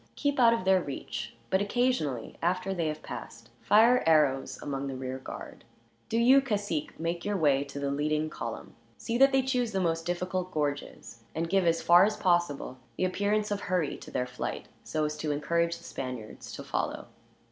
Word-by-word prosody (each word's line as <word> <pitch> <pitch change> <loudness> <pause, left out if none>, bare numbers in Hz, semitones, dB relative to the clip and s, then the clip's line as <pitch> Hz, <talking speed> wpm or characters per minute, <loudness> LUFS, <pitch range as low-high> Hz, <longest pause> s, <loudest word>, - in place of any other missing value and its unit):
Keep 285 -2 0
out 235 -2 +7
of 230 -5 0
their 190 -1 +5
reach; 120 -6 -6 0.2
but 190 - +3
occasionally, 205 - 0
after 185 +3 0
they 170 -4 -1
have 155 0 -4
passed, - - -8
fire 230 +4 +5
arrows 145 -4 +3
among 140 -1 -3
the 135 - -4
rear 130 0 -4
guard. - - -9 0.5
"Do 225 - 0
you, 255 +4 +6
cacique, 205 - -2
make 170 +1 -2
your 205 0 -1
way 140 -5 +3
to 140 0 -9
the 140 0 -1
leading 150 +2 0
column. - - -6 0.2
See 235 +1 -2
that 270 0 +7
they 265 -1 +3
choose 250 -4 0
the 190 - +1
most 165 -2 0
difficult 180 +1 -2
gorges; 145 -6 -3 0.2
and 165 +1 -1
give, 195 -3 +3
as 165 0 +2
far 175 +1 +7
as 210 +1 +1
possible, 175 -8 0 0.2
the 185 - +1
appearance 205 +3 0
of 205 - 0
hurry 180 -5 0
to - - -11
their 125 - -1
flight, 125 0 -5 0.2
so 155 -1 -1
as 150 0 -2
to 150 0 -2
encourage 170 +3 0
the 170 - -17
Spaniards 125 -8 -7
to - - -7
follow." - - -2
170 Hz, 190 wpm, -29 LUFS, 145-205 Hz, 0.5 s, out